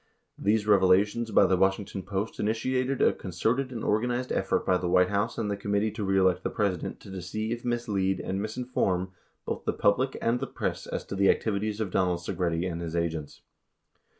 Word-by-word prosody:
These 105 +1 +2
revelations 105 +3 +3
by - - +5
the 95 - +3
Washington 95 +1 0
Post 100 +3 -4
initiated 130 +5 0
a - - +5
concerted 115 +9 -1
and 115 -3 -5
organized 125 +4 0
effort - - 0
by 90 -1 +3
the 90 - -2
White 90 0 +4
House 100 +3 -1
and 105 -3 -1
the - - 0
Committee 100 +2 0
To 105 - -5
Re 95 0 +1
Elect 95 -1 +3
the - - -1
President 100 -5 -2
to - - -11
deceive, 110 +6 -4
mislead, 105 -6 0
and 95 +2 -3
misinform 110 -5 -1 0.4
both - - -4
the - - +1
public 130 +6 +1
and 115 +2 +1
the 135 - -3
press - - -3
as - - -4
to - - -5
the 100 0 +4
activities 105 0 0
of 105 -4 -2
Donald 90 -2 +2
Segretti 85 0 -2
and 85 -1 -4
his 85 -1 -4
agents. 80 -3 -3
100 Hz, 190 wpm, -28 LUFS, 95-115 Hz, 0.4 s, by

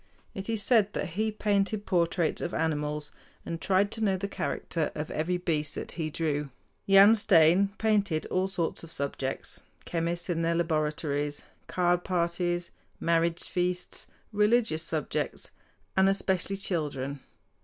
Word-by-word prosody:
It 195 +2 -6
is 220 -3 +1
said 210 -3 +3
that - - -2
he 215 +6 -1
painted 205 0 0
portraits 170 -2 +1
of 175 - -3
animals, 150 -1 -1 0.3
and 165 -1 -4
tried 195 +2 +2
to 225 - -6
know 195 -3 +2
the 200 +2 -3
character 165 -5 -2
of 150 0 -4
every 175 +4 0
beast 155 -4 -1
that - - -5
he 160 -2 -3
drew. 150 -2 -1 0.4
Jan 195 +2 +8
Steen 190 -2 +5
painted 205 -7 +1
all 185 +1 +1
sorts 175 -4 -2
of 165 - -10
subjects, 140 -2 -4 0.2
chemists 170 +1 -1
in 170 -2 0
their 165 0 +1
laboratories, 150 -3 -1 0.2
card 175 -1 +1
parties, 175 -1 -1 0.3
marriage 170 0 +1
feasts, 180 0 -2 0.3
religious 210 -5 +3
subjects, 160 -2 -2 0.4
and 190 0 +5
especially 195 0 0
children. 145 -7 -2
175 Hz, 140 wpm, -29 LUFS, 160-195 Hz, 0.4 s, Jan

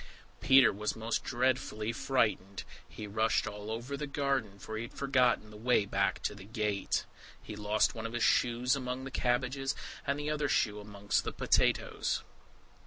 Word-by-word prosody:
Peter 135 -1 +6
was 105 +2 -2
most 115 +1 -2
dreadfully 120 -3 0
frightened; 105 -7 0 0.3
he 110 - -7
rushed 110 +2 +1
all 105 0 -6
over 120 +5 -4
the 150 +1 -4
garden, 135 -8 -1
for 110 +3 -7
he 110 - -3
had 115 - -7
forgotten 125 -5 +2
the - - -12
way 115 -1 +2
back 100 -1 0
to - - -1
the 100 -2 -11
gate. 105 -2 -1 0.3
He 105 - -8
lost 105 +1 +1
one 115 0 -4
of 115 - -10
his 120 - 0
shoes 125 +2 +3
among 130 -1 -4
the 135 - -7
cabbages, 130 +2 0 0.3
and 140 +1 +1
the 150 +1 -2
other 150 -2 0
shoe 105 -4 +1
amongst 105 0 -1
the - - -3
potatoes. - - +1
115 Hz, 175 wpm, -32 LUFS, 105-130 Hz, 0.3 s, Peter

